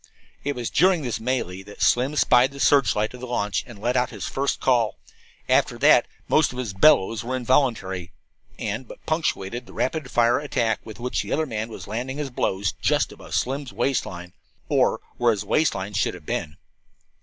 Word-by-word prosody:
It 145 0 -2
was 120 -2 -4
during 180 +2 +3
this 120 -4 -2
mêlée 110 -6 -2
that 105 - -5
Slim 130 +5 +3
spied 125 -2 +4
the 140 - -10
searchlight 125 -7 +3
of 125 - -9
the 125 - -7
launch 105 -4 -1
and 120 -4 -11
let 120 +5 -1
out 125 0 +2
his - - -6
first 140 +1 -1
call. 120 -5 +2 0.5
After - - +2
that - - +5 0.2
most 155 -3 +3
of 125 - -9
his 120 -6 -3
"bellows" 105 -1 +4
were 130 +2 -2
involuntary 115 -9 0 0.5
and 110 +4 -4
but - - -13
punctuated 125 - -2
the - - -13
rapid 140 0 -2
fire 120 +1 +3
attack 120 -7 0
with 110 0 -10
which 125 +1 -1
the - - -7
other 160 +2 +1
man 110 -4 -4
was 110 - -8
landing 125 +6 -4
his 145 -3 -4
blows 100 -4 0
just - - +2
above - - -7
Slim's 135 +1 -1
waist 135 -3 0
line, 90 0 -8 0.4
or - - +2 0.2
where 120 -1 +3
his 105 -2 0
waist 155 +9 +2
line 95 +2 -4
should 100 -3 0
have 85 -4 -13
been. 75 +1 -3
120 Hz, 195 wpm, -24 LUFS, 105-135 Hz, 0.5 s, that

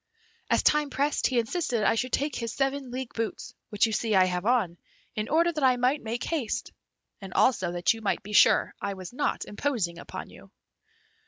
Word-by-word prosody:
As - - +3
time 300 -1 +3
pressed, 280 +2 +1
he 255 - -1
insisted 235 -1 0
I - - +4
should 250 +3 -2
take 285 -1 0
his 230 -1 -3
seven 270 -1 -1
league 255 0 -5
boots, 225 -1 -4 0.2
which 210 +1 +2
you 225 - -2
see 220 0 0
I 185 -1 +6
have 180 +2 -2
on, 215 -9 +1 0.4
in 215 0 -3
order 335 +3 +3
that 305 -3 -3
I 255 -1 +4
might 255 +4 +1
make 230 +2 -4
haste, 255 -8 -2 0.5
and 195 -1 -8
also 185 -9 +2
that 175 +4 +2
you 225 - -9
might 210 - -1
be 210 +2 -8
sure - - +5
I 200 -1 -3
was 185 +2 -9
not 285 +3 -1
imposing 205 -8 -2
upon - - -8
you." - - -15
235 Hz, 200 wpm, -27 LUFS, 205-270 Hz, 0.5 s, I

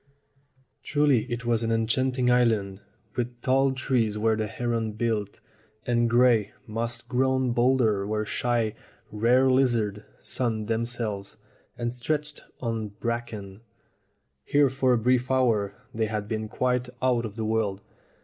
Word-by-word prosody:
Truly 145 -5 +2
it 120 0 -3
was 120 -1 +1
an 115 0 -1
enchanting 125 +3 +1
island, 110 -6 +2 0.3
with 120 0 -3
tall 135 +1 +3
trees 125 -5 0
where 110 +1 +2
the 110 0 -2
herons 115 0 -2
built, 110 -3 -2 0.4
and 120 -1 +2
gray, 120 -3 +4
moss 115 +2 -3
grown 130 0 +1
boulders 120 -5 +2
where 105 0 -1
shy, 115 -1 0 0.4
rare 120 +5 +3
lizards 120 -6 +2 0.2
sunned 110 -4 -2
themselves, 115 -3 -2 0.4
and 120 0 -2
stretches 150 +4 -3 0.2
of 110 -4 -4
bracken. 110 -4 -4 0.8
Here 145 - +3
for 130 -1 +2
a - - +3
brief 125 +2 +1
hour 115 -6 +2 0.2
they 110 -1 0
had 105 -1 -3
been 110 0 -3
quite 125 +1 0
out 125 -2 +2
of 105 -3 -6
the 110 -1 -3
world. 110 -3 0
115 Hz, 135 wpm, -26 LUFS, 110-125 Hz, 0.8 s, gray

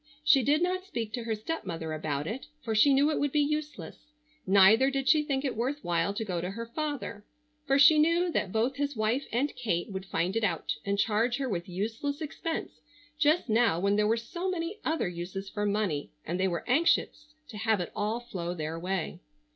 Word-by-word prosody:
She 295 -2 +6
did 295 +7 +2
not 370 +1 0
speak 230 - -5
to 240 -2 -4
her 225 -1 -1
stepmother 185 - -4
about 150 -2 -2
it, 235 - -5 0.2
for 225 - -2
she 220 +7 +5
knew 280 +3 +4
it - - -1
would 290 -1 0
be 300 - +2
useless; 300 0 -3 0.3
neither 200 +7 +6
did 270 -1 -2
she 305 +3 +5
think 285 -2 -2
it 265 - -1
worth 265 +6 -2
while 170 +2 +1
to 220 - -2
go 180 -4 -2
to 180 - -3
her 230 +4 -5
father, 285 -4 -4 0.4
for 270 0 +4
she 300 +2 +7
knew 340 +3 +3
that 195 - -1
both 235 +5 0
his 285 -1 -1
wife 225 +5 0
and 265 +6 0
Kate 210 -7 -2
would 190 0 -6
find 180 +3 -1
it 225 - 0
out 180 -6 0
and 200 0 -1
charge 225 +4 +1
her 275 -1 -2
with 175 -6 -3
useless 225 - -3
expense 320 +1 -5 0.4
just 305 +2 +3
now 225 -6 +3
when 200 +2 +2
there 210 0 +2
were 225 +2 +2
so 345 +11 -4
many 360 +3 -3
other 320 - 0
uses 180 +3 -6
for 205 0 -1
money, 200 -8 -1 0.2
and 175 +3 -3
they 190 - +2
were 170 -3 -3
anxious 300 +1 +1
to 215 - -8
have 220 0 +1
it 175 - -4
all 215 +3 -1
flow 180 -7 -5
their 160 0 -4
way. 185 -1 -3
230 Hz, 210 wpm, -29 LUFS, 195-290 Hz, 0.4 s, she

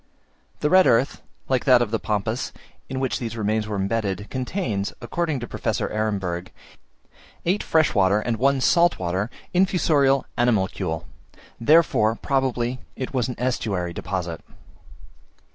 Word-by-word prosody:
The 150 - +2
red 185 0 +7
earth, 120 +4 +2 0.3
like 130 -2 0
that 130 -3 +7
of 120 -3 -1
the 115 - 0
Pampas, 110 +3 -2 0.4
in 130 - -3
which 130 -2 -1
these 115 -1 -5
remains 110 0 0
were 105 - -3
embedded, 100 0 -2
contains, 125 - -2
according 165 -5 -2
to 120 - -5
Professor - - -2
Ehrenberg, 95 -5 -2 0.9
eight 185 +5 +1
fresh 160 -2 +2
water 100 0 +3
and 115 +1 -2
one 135 +2 +2
salt 170 +4 +4
water 95 +4 -2 0.2
infusorial 155 -7 +3
animalcule; 95 -8 0 0.5
therefore, 115 -5 +4
probably, 130 -2 -1 0.2
it 130 - -5
was 130 -2 +1
an 125 - -4
estuary 100 -8 -1
deposit. 90 -3 -4
115 Hz, 135 wpm, -23 LUFS, 100-135 Hz, 0.9 s, red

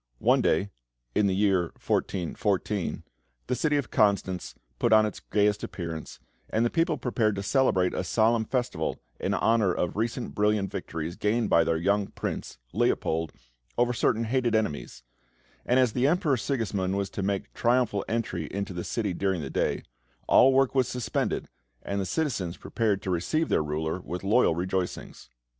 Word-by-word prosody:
One - - +3
day, 95 +6 +1 0.4
in 105 - +3
the 95 - +1
year 95 -3 +3
1414, 95 +1 -1 0.4
the 125 - -1
city 145 +4 +1
of 140 - -3
Constance 100 -4 +1 0.2
put 120 - +2
on 110 0 +7
its 105 - -4
gayest 105 -1 +1
appearance, 80 -3 -6 0.3
and 115 +2 +1
the 120 - 0
people 165 -2 +1
prepared 115 -4 0
to 100 - -4
celebrate 100 -7 +2
a - - -1
solemn 110 +4 +2
festival 120 -10 -2 0.2
in - - 0
honour 110 -4 +3
of 90 -1 -1
recent 115 +3 -2
brilliant 105 -2 +1
victories 80 +1 -4
gained 110 +1 0
by 85 - +6
their 80 0 +1
young 100 +4 +1
Prince, - - -5 0.2
Leopold, 80 0 0 0.5
over 120 0 +2
certain 115 0 +1
hated 120 0 +1
enemies, 75 - -2 0.6
and 125 +2 +4
as 125 -4 +3
the 130 +2 +2
Emperor 155 -3 +2
Sigismund 105 -7 -1
was 100 -1 -2
to - - -4
make 100 0 0
a - - -33
triumphal 120 -4 +1
entry 100 -8 -2
into 100 0 -4
the 85 0 -4
city 105 -5 -2
during 95 -1 0
the 70 - -5
day, - - 0 0.4
all 135 - +7
work 135 0 +3
was 130 -2 +2
suspended, 125 -2 -2 0.4
and 100 0 -2
the 95 - -3
citizens 100 - -1
prepared 105 -4 -1
to 95 - -2
receive 90 - 0
their - - +2
ruler 80 +3 -2
with 90 +1 -6
loyal 105 -3 +3
rejoicings. 90 -6 -3
105 Hz, 170 wpm, -27 LUFS, 90-120 Hz, 0.6 s, on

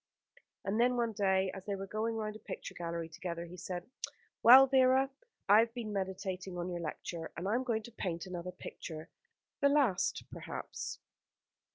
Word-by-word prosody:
And 200 +3 0
then, 250 +1 +3
one 235 -1 +1
day, 190 -2 +2
as 190 - -7
they 200 - 0
were 195 0 -5
going 220 +3 -1
round 215 -1 -3
a - - -9
picture - - -7
gallery 170 -1 -3
together, 170 +1 -5
he 175 +1 -10
said: 180 0 -5 0.5
"Well, 260 +3 +11
Vera, 265 0 +4 0.4
I 205 +2 +8
have 230 +1 +2
been 220 -4 -4
meditating 190 -1 -3
on 175 +1 -2
your 175 - -3
lecture; 165 +1 -5
and 175 +3 -3
I 205 - +1
am 250 +2 +2
going 225 -3 0
to 235 - -10
paint 180 -6 -3
another 180 -1 -5
picture 160 -2 -8 0.5
the 280 - +5
last, 270 -10 +2
perhaps." - - -5
195 Hz, 180 wpm, -33 LUFS, 180-230 Hz, 0.5 s, Well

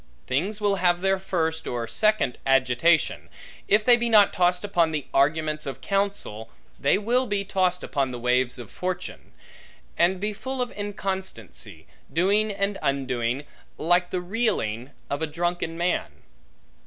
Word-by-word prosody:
Things 190 +11 -1
will 205 -2 +1
have 175 -1 +2
their 195 0 +2
first, 160 -4 -2
or 120 -1 -2
second 215 - +1
agitation: 135 +5 +2 0.4
if 210 +1 +3
they 245 - +8
be 240 0 -1
not 210 -3 +6
tossed 180 +1 +2
upon 170 -5 +2
the 150 -3 -3
arguments 155 +2 +1
of 135 - -5
counsel, 195 - -2 0.3
they 140 - +3
will 245 +5 +1
be 200 -2 -1
tossed 185 -2 0
upon 135 -2 -1
the 125 - -5
waves 125 +1 +1
of 120 -4 -9
fortune; 180 0 -5 0.7
and 180 +2 +3
be 210 +2 -2
full 260 +5 -5
of 250 -1 -1
inconstancy, 190 - -5 0.3
doing 205 +5 +2
and 200 0 -1
undoing, 130 -2 -1 0.3
like 175 +2 +2
the 180 - -2
reeling 175 - -1 0.2
of 140 +2 -3
a 160 - 0
drunken 170 +1 -2
man. 175 +1 0
175 Hz, 150 wpm, -25 LUFS, 140-200 Hz, 0.7 s, they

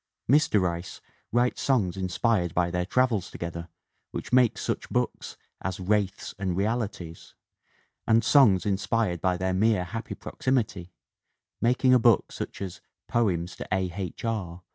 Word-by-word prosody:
Mr. 145 -4 +4
Rice 85 -1 -3 0.3
writes 120 +2 +1
songs 110 -10 +1
inspired 95 0 0
by 85 -1 +1
their 90 0 -1
travels 125 -4 +1
together 85 0 -6 0.4
which - - -7
make 125 -3 +4
such - - -3
books - - -2 0.2
as 95 +1 -3
Wraiths 100 0 -1
and 95 -3 -1
Realities 100 -6 -3 0.7
and 115 +1 +4
songs 105 - +5
inspired 100 -2 0
by 90 -1 +1
their 95 +1 -1
mere 105 0 +2
happy 110 +6 -6
proximity, 105 -9 -2 0.7
making 125 +2 +3
a 125 - +6
book 115 -3 +3
such - - -6
as 95 -3 -7 0.3
Poems 90 -7 0
to - - -7
A. 95 -1 0
H. 95 +2 -5
R. 90 -6 -3
95 Hz, 140 wpm, -27 LUFS, 90-115 Hz, 0.7 s, a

